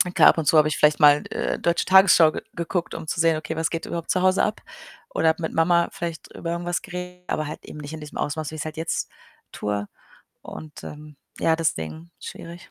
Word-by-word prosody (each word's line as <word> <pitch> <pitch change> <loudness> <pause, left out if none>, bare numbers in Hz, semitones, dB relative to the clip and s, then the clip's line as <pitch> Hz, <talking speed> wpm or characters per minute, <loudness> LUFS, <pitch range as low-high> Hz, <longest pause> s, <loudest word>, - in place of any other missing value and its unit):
Klar, - - +8
ab - - +3
und 160 - -1
zu 155 - +5
habe 155 0 +6
ich 155 - -2
vielleicht 150 0 +4
mal, 145 0 +6
äh, - - -1
deutsche 170 0 +1
Tagesschau 185 -4 +7
ge - - -4
geguckt, 170 +1 -2
um 165 -1 -7
zu 165 - -3
sehen: 165 -1 +3
„Okay, 155 +1 -5
was 160 0 0
geht 165 - -4
überhaupt 170 -1 -3
zu 185 - +1
Hause 185 0 +3
ab?“ 210 - -1 0.5
Oder 160 0 +3
mit 160 - -3
Mama 170 +1 +3
vielleicht 170 -2 -6
über 170 - -4
irgendwas 175 +1 -2
geredet, 180 -1 -8
aber 155 -1 -1
halt 150 - -8
eben 150 - -9
nicht 145 +1 -8
in 160 - -6
diesem 150 - -9
Ausmaß, 155 +1 -3
wie - - -7
ich's 155 - -5
halt 155 0 -6
jetzt 165 +1 -2 0.4
tue 105 0 -3 0.6
und, 155 -1 -10
ähm, 150 -1 -10 0.2
ja, 160 0 +3
deswegen 160 - -3
schwierig. 170 +1 -10
160 Hz, 220 wpm, -24 LUFS, 155-170 Hz, 0.6 s, Klar